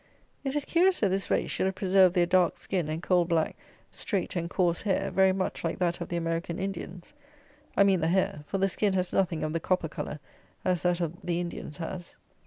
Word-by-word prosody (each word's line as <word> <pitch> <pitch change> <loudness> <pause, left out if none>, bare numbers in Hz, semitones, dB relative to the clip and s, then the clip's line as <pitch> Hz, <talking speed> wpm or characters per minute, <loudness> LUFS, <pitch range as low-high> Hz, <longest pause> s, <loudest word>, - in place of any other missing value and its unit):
It 270 0 -2
is 295 - 0
curious 360 +2 +3
that 205 - +3
this 195 +1 0
race - - +1
should 190 - 0
have 190 - -2
preserved 190 -1 +4
their 175 -1 +4
dark 180 -1 +3
skin 175 -6 -2
and 160 +2 -3
coal 180 -2 +3
black 165 -2 0 0.4
straight 195 -3 -2
and 170 -1 -2
coarse 175 -2 +1
hair, 195 -1 0
very 190 +1 +4
much 185 0 -2
like 165 - -1
that 175 -1 0
of - - -4
the 175 - -1
American 165 +1 -2
Indians. 190 +2 -6 0.6
I 200 - +7
mean 195 -3 +3
the 160 - +2
hair, 170 -4 +1
for 195 - -2
the 195 0 +2
skin 200 +1 0
has 185 -1 0
nothing 175 -4 +1
of 155 - -2
the 165 - 0
copper 180 -2 0
colour 150 - -5 0.5
as 180 -2 +1
that 175 0 +1
of 165 -2 -1
the 175 -1 -1
Indians 170 -4 -5
has. 175 +1 -6
180 Hz, 220 wpm, -28 LUFS, 170-190 Hz, 0.6 s, I